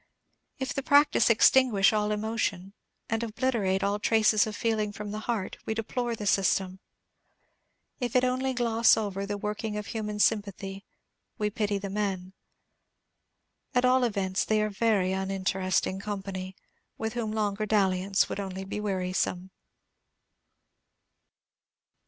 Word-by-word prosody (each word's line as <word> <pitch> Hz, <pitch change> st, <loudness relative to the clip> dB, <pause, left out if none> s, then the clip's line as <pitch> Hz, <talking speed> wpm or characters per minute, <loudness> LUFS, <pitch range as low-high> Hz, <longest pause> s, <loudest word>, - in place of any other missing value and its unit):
If 265 Hz, -2 st, -3 dB
the 275 Hz, -, -2 dB
practice 285 Hz, -4 st, +4 dB
extinguish 230 Hz, -3 st, +5 dB
all 210 Hz, 0 st, +1 dB
emotion, 210 Hz, -3 st, -2 dB, 0.3 s
and 225 Hz, 0 st, -1 dB
obliterate 220 Hz, -4 st, 0 dB
all 200 Hz, +1 st, 0 dB
trace 215 Hz, -1 st, +3 dB
of 215 Hz, -, -5 dB
feeling 220 Hz, -2 st, 0 dB
from 205 Hz, 0 st, -7 dB
the 215 Hz, -, -4 dB
heart, 215 Hz, -5 st, -2 dB
we 220 Hz, -, -1 dB
deplore 235 Hz, +2 st, -2 dB
the 210 Hz, -, -6 dB
system. 190 Hz, -1 st, +1 dB, 1.2 s
If 245 Hz, -2 st, -3 dB
it 255 Hz, -, +4 dB
only 255 Hz, +1 st, 0 dB
gloss 230 Hz, -2 st, +4 dB
over 200 Hz, -2 st, -3 dB
the 205 Hz, 0 st, -3 dB
working 210 Hz, +1 st, -3 dB
of 210 Hz, -, -4 dB
human 210 Hz, -1 st, -4 dB
sympathy, 200 Hz, -2 st, 0 dB, 0.5 s
we 210 Hz, -2 st, -1 dB
pity 210 Hz, -2 st, -1 dB
the 195 Hz, 0 st, -5 dB
men. 195 Hz, -3 st, -3 dB, 1.4 s
At 250 Hz, 0 st, +3 dB
all 255 Hz, 0 st, +4 dB
events, 195 Hz, -5 st, 0 dB
they 215 Hz, -1 st, +1 dB
are 215 Hz, -, -2 dB
very 200 Hz, -3 st, +1 dB
uninteresting 190 Hz, -1 st, -1 dB
company, 195 Hz, -2 st, -5 dB, 0.4 s
with 220 Hz, 0 st, -3 dB
whom 230 Hz, -3 st, -2 dB
longer 215 Hz, -1 st, -1 dB
dalliance 195 Hz, -2 st, +2 dB
would -, -, -5 dB
only 190 Hz, -1 st, -5 dB
be 195 Hz, +2 st, -5 dB
wearisome. 185 Hz, -2 st, -2 dB
210 Hz, 135 wpm, -28 LUFS, 195-225 Hz, 1.4 s, extinguish